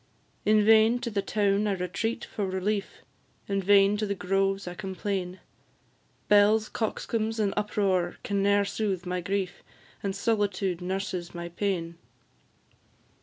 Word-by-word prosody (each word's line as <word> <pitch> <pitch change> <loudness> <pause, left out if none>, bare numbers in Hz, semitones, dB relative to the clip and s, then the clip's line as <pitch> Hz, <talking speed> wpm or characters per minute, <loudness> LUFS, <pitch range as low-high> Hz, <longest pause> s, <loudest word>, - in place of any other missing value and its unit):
In 215 0 +4
vain 220 +2 +6
to 240 -1 -3
the 200 -1 0
town 205 0 +1
I 205 - +1
retreat 195 +6 -2
for 205 -2 -3
relief, 195 +2 -2 0.4
In 195 -1 0
vain 200 +1 +5
to 215 0 -1
the 200 - -1
groves 195 +1 0
I 175 - -4
complain; 190 -1 -4 0.9
Belles, 210 +1 +5
coxcombs, 225 0 -2
and 205 -2 +1
uproar, 195 -4 0
can 200 -5 -1
ne'er 200 0 +3
soothe 195 -3 -2
my 180 0 -2
grief, 195 0 -2 0.4
And 195 -1 -2
solitude 200 -4 0
nurses 185 -1 -3
my 170 0 -5
pain. 170 -2 -3
200 Hz, 135 wpm, -27 LUFS, 185-210 Hz, 0.9 s, vain